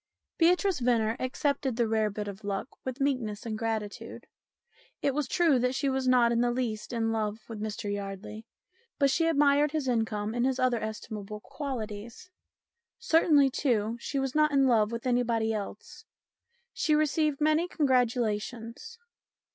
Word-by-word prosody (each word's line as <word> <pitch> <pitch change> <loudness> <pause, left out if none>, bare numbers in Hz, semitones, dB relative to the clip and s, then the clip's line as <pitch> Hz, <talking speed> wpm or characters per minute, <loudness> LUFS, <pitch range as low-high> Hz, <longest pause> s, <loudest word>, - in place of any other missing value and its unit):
Beatrice 360 +2 +3
Venner 230 -3 +2
accepted 270 0 -1
the 235 -1 +1
rare 220 -1 +1
bit 205 0 -5
of 200 +1 -8
luck 200 +5 -3
with 260 +1 -5
meekness 250 -7 -1
and 220 -2 -3
gratitude. 220 -2 -4 0.8
It 280 - +2
was 295 0 -1
true 325 -7 +3
that 250 +1 0
she 275 - 0
was 265 -1 -1
not 245 -2 +5
in 235 0 +2
the 245 - +2
least 235 -4 -3
in 225 -2 0
love 220 0 -2
with 220 -2 -7
Mr 210 -1 -3
Yardley, 205 +2 -6 0.5
but 280 -2 +3
she 330 +4 +2
admired 290 -1 +3
his 305 -4 -1
income 220 -3 -1
and 240 0 0
his 260 0 +1
other 255 -3 +2
estimable 215 -1 -6
qualities. 235 - -6 0.7
Certainly, 315 - +4
too, 230 -5 0
she 275 - -4
was 270 -1 -1
not 305 0 +4
in 275 -1 +4
love 220 -4 +3
with 235 +1 -5
anybody 235 -3 +1
else. 205 -2 -7 0.7
She 305 - +1
received 305 -1 +1
many 310 +3 +2
congratulations. 245 - -1
240 Hz, 155 wpm, -29 LUFS, 220-280 Hz, 0.8 s, not